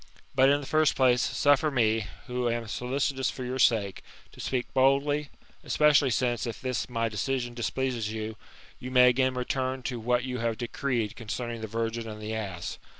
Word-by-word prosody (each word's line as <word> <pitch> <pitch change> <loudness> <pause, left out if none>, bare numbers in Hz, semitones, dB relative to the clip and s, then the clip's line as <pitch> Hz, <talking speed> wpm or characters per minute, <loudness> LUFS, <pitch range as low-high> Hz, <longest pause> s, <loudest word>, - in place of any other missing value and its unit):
But, 135 0 +5
in 145 +1 +4
the - - -7
first 155 +2 +2
place, 125 -2 +4
suffer 145 +1 +3
me, 110 -5 +1 0.2
who 125 -1 -1
am 115 0 -2
solicitous 130 +4 -1
for 130 - -6
your 130 +1 -3
sake, 110 -6 +2 0.3
to - - -17
speak 125 -2 -2
boldly, 140 +2 +2 0.3
especially 150 -2 +4
since, 120 0 0
if 115 - -5
this 130 -1 -2
my 115 -1 0
decision 120 +3 -2
displeases 120 -2 -2
you, 110 0 -4 0.4
you 125 - -6
may 125 -1 +6
again 130 +1 +1
return 130 +1 -2
to 125 -1 -3
what 120 +2 +1
you 125 -1 -3
have 115 -1 -1
decreed 120 -2 -2
concerning 115 +1 -5
the 110 - -4
virgin 115 +1 -3
and 105 0 -7
the 110 +1 -5
ass. 95 -6 -5
125 Hz, 180 wpm, -28 LUFS, 115-130 Hz, 0.4 s, may